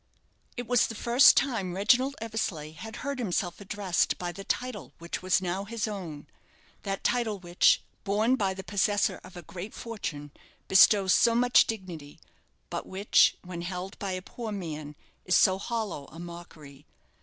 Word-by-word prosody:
It 245 Hz, -, -4 dB
was 245 Hz, 0 st, +3 dB
the 225 Hz, -, -7 dB
first 240 Hz, +6 st, +6 dB
time 220 Hz, -10 st, 0 dB
Reginald 250 Hz, +7 st, +3 dB
Eversleigh 210 Hz, -9 st, -3 dB
had 220 Hz, +7 st, -9 dB
heard 280 Hz, -2 st, -3 dB
himself 180 Hz, -4 st, -2 dB
addressed 195 Hz, -2 st, 0 dB
by 175 Hz, -1 st, -4 dB
the 195 Hz, +3 st, -9 dB
title 245 Hz, -1 st, -4 dB
which 170 Hz, 0 st, -6 dB
was 185 Hz, 0 st, +2 dB
now 185 Hz, +2 st, -2 dB
his 225 Hz, +1 st, -3 dB
own 170 Hz, -9 st, -6 dB, 0.6 s
that 195 Hz, -1 st, -4 dB
title 235 Hz, -4 st, 0 dB
which, 175 Hz, -1 st, +3 dB, 0.2 s
borne 215 Hz, +5 st, +2 dB
by 195 Hz, -6 st, -1 dB
the 190 Hz, -, -7 dB
possessor 205 Hz, +1 st, 0 dB
of 185 Hz, -1 st, -12 dB
a 175 Hz, -, -8 dB
great 175 Hz, +6 st, -8 dB
fortune, 165 Hz, -11 st, -6 dB, 0.4 s
bestows 195 Hz, 0 st, +6 dB
so 230 Hz, -1 st, +4 dB
much 245 Hz, +1 st, +5 dB
dignity; 175 Hz, -9 st, -7 dB, 0.5 s
but -, -, -4 dB
which, 195 Hz, +2 st, +3 dB
when 180 Hz, -2 st, -7 dB
held 180 Hz, +2 st, -6 dB
by 195 Hz, -2 st, -3 dB
a 185 Hz, 0 st, -5 dB
poor 225 Hz, +2 st, -7 dB
man, 155 Hz, -6 st, -6 dB, 0.3 s
is 180 Hz, -, +2 dB
so 190 Hz, 0 st, +4 dB
hollow 215 Hz, -, -3 dB
a -, -, -14 dB
mockery. 165 Hz, -5 st, -11 dB
195 Hz, 165 wpm, -28 LUFS, 175-225 Hz, 0.6 s, first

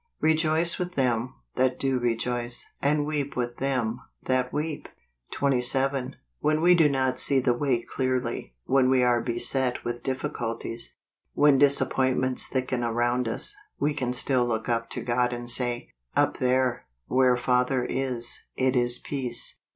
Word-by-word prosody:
" -, -, -51 dB
Rejoice 160 Hz, +1 st, +2 dB
with 180 Hz, 0 st, -3 dB
them 125 Hz, -2 st, 0 dB, 0.2 s
that 130 Hz, 0 st, +2 dB
do 135 Hz, -2 st, +1 dB
rejoice, 120 Hz, 0 st, -1 dB, 0.2 s
and 145 Hz, +1 st, +2 dB
weep 145 Hz, -2 st, -2 dB
with 120 Hz, -1 st, -2 dB
them 125 Hz, -4 st, -1 dB, 0.2 s
that 130 Hz, -1 st, 0 dB
weep." 150 Hz, 0 st, -3 dB, 0.5 s
27. 135 Hz, 0 st, 0 dB, 0.2 s
When 155 Hz, 0 st, +2 dB
we 175 Hz, +2 st, +6 dB
do 165 Hz, -4 st, +5 dB
not 130 Hz, -2 st, 0 dB
see 135 Hz, 0 st, +2 dB
the 125 Hz, -1 st, +2 dB
way 120 Hz, -2 st, 0 dB
clearly; 130 Hz, -, -2 dB
when 130 Hz, -1 st, +3 dB
we 130 Hz, -1 st, +4 dB
are 120 Hz, -1 st, +3 dB
beset 125 Hz, +2 st, 0 dB
w 120 Hz, -, -3 dB
T -, -, -11 dB
ith -, -, -31 dB
difficulties; 115 Hz, -3 st, -4 dB, 0.4 s
when 145 Hz, -2 st, +5 dB
disappointments 130 Hz, -2 st, +2 dB
thicken 130 Hz, -2 st, -1 dB
around 120 Hz, +1 st, +1 dB
us, 265 Hz, -, -3 dB, 0.2 s
we 150 Hz, +1 st, +1 dB
can 130 Hz, -4 st, -2 dB
still 125 Hz, 0 st, +1 dB
look 110 Hz, -2 st, -2 dB
up 115 Hz, -1 st, -1 dB
to -, -, -5 dB
God 125 Hz, 0 st, +1 dB
and 120 Hz, 0 st, -6 dB
say, 120 Hz, 0 st, -1 dB
" -, -, -39 dB
Up -, -, +2 dB
there, 130 Hz, -, +1 dB, 0.2 s
where 125 Hz, -1 st, +3 dB
Father 125 Hz, +1 st, +1 dB
is, 125 Hz, -3 st, -3 dB
it 130 Hz, 0 st, +1 dB
is 120 Hz, 0 st, +2 dB
peace." 125 Hz, -4 st, -2 dB
130 Hz, 160 wpm, -26 LUFS, 120-135 Hz, 0.5 s, we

